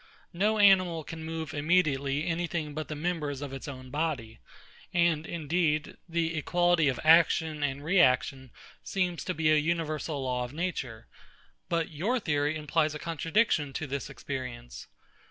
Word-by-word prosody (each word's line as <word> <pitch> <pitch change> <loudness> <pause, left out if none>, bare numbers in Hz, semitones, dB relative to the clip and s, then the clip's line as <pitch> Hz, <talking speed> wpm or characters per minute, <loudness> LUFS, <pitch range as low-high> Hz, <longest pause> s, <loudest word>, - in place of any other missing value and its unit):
No 210 +5 +1
animal 185 -5 +5
can 160 +1 -8
move 160 -1 -5
immediately 145 -3 +1
any 170 +1 -1
thing 155 -3 -3
but 155 0 -4
the 155 - -5
members 150 -3 -2
of 140 -2 -6
its 135 - -7
own 130 -2 -8
body; 145 -8 -2 0.5
and 170 -3 +2
indeed, 160 -1 -1
the 165 0 0
equality 175 0 +2
of 130 -3 0
action 160 -1 +4
and 140 0 -2
reaction 135 -5 +2 0.3
seems 180 -3 -2
to 185 - -2
be 160 -1 +2
an 150 - +2
universal 155 -3 -2
law 125 -1 -1
of 125 +2 -7
nature: 145 -9 -4 0.6
But 170 -1 0
your 205 +12 0
theory 150 -5 0
implies 155 0 0
a - - -2
contradiction 165 -1 0
to 155 - -3
this 140 0 -4
experience. 125 -3 -7
155 Hz, 155 wpm, -29 LUFS, 145-170 Hz, 0.6 s, animal